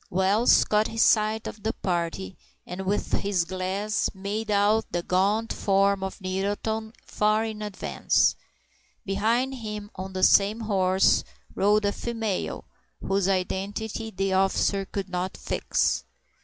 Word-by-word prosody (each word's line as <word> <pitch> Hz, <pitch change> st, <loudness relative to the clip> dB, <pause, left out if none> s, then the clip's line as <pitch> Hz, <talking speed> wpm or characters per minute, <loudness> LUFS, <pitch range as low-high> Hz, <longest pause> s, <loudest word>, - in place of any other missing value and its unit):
Wells 195 Hz, +5 st, +4 dB
caught 215 Hz, 0 st, +2 dB
sight 215 Hz, 0 st, +3 dB
of 210 Hz, -, -7 dB
the 220 Hz, +2 st, -1 dB
party, 170 Hz, -, -3 dB, 0.3 s
and 185 Hz, +1 st, -6 dB
with 205 Hz, +2 st, -1 dB
his 195 Hz, -4 st, 0 dB
glass 190 Hz, +4 st, -1 dB
made 205 Hz, +3 st, -4 dB
out 210 Hz, +2 st, +2 dB
the 175 Hz, 0 st, -2 dB
gaunt 205 Hz, +6 st, +1 dB
form 195 Hz, 0 st, +2 dB
of 190 Hz, +2 st, -5 dB
Nettleton 205 Hz, +4 st, -2 dB
far 215 Hz, +1 st, +1 dB
in 215 Hz, -1 st, -5 dB
advance. 210 Hz, -2 st, +1 dB, 0.7 s
Behind 225 Hz, +7 st, +1 dB
him 210 Hz, -4 st, -6 dB
on 190 Hz, 0 st, -7 dB
the 185 Hz, 0 st, -2 dB
same 205 Hz, +4 st, +5 dB
horse 190 Hz, -3 st, +3 dB, 0.3 s
rode 210 Hz, +1 st, +2 dB
a 200 Hz, -, +2 dB
female, 225 Hz, -3 st, -3 dB, 0.3 s
whose 195 Hz, -1 st, 0 dB
identity 200 Hz, +4 st, -2 dB
the 195 Hz, -2 st, -1 dB
officer 195 Hz, +1 st, +1 dB
could 195 Hz, 0 st, -4 dB
not 180 Hz, 0 st, -3 dB
fix. -, -, 0 dB
200 Hz, 130 wpm, -26 LUFS, 190-215 Hz, 0.7 s, same